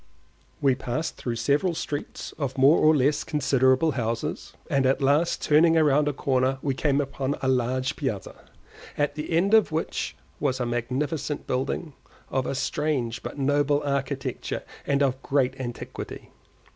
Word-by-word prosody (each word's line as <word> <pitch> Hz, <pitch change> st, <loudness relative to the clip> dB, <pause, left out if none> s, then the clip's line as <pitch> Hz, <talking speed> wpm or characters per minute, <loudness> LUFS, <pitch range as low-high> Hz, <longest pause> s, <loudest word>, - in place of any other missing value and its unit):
We 135 Hz, -2 st, +4 dB
passed 125 Hz, +4 st, -3 dB
through 120 Hz, -2 st, -4 dB
several 145 Hz, +9 st, +1 dB
streets 145 Hz, -2 st, -5 dB
of 135 Hz, -3 st, -3 dB
more 135 Hz, +5 st, +6 dB
or 155 Hz, 0 st, +5 dB
less 145 Hz, +1 st, +2 dB
considerable 135 Hz, +1 st, +2 dB
houses, 115 Hz, -3 st, -3 dB
and 135 Hz, -1 st, +2 dB
at 135 Hz, -, +2 dB
last 145 Hz, +5 st, +2 dB
turning 160 Hz, +2 st, +5 dB
round 150 Hz, -2 st, +4 dB
a -, -, +2 dB
corner 130 Hz, -1 st, +1 dB
we 140 Hz, -, +1 dB
came 140 Hz, +1 st, +1 dB
upon 135 Hz, 0 st, -2 dB
a -, -, +1 dB
large 130 Hz, +1 st, 0 dB
piazza, 110 Hz, -10 st, -3 dB, 0.6 s
at 145 Hz, 0 st, +1 dB
the 150 Hz, +1 st, -5 dB
end 175 Hz, +5 st, +2 dB
of 220 Hz, -6 st, +5 dB
which 160 Hz, +1 st, -2 dB, 0.2 s
was 130 Hz, -3 st, 0 dB
a 125 Hz, -, 0 dB
magnificent 130 Hz, +5 st, -2 dB
building, 135 Hz, +4 st, -2 dB, 0.4 s
of 130 Hz, -1 st, 0 dB
a -, -, -2 dB
strange 130 Hz, -5 st, -1 dB
but -, -, -7 dB
noble 145 Hz, +1 st, +2 dB
architecture 140 Hz, -1 st, -2 dB, 0.2 s
and 140 Hz, 0 st, +2 dB
of 130 Hz, -1 st, 0 dB
great 135 Hz, -2 st, +1 dB
antiquity. 120 Hz, -2 st, -7 dB
140 Hz, 155 wpm, -26 LUFS, 130-150 Hz, 0.6 s, more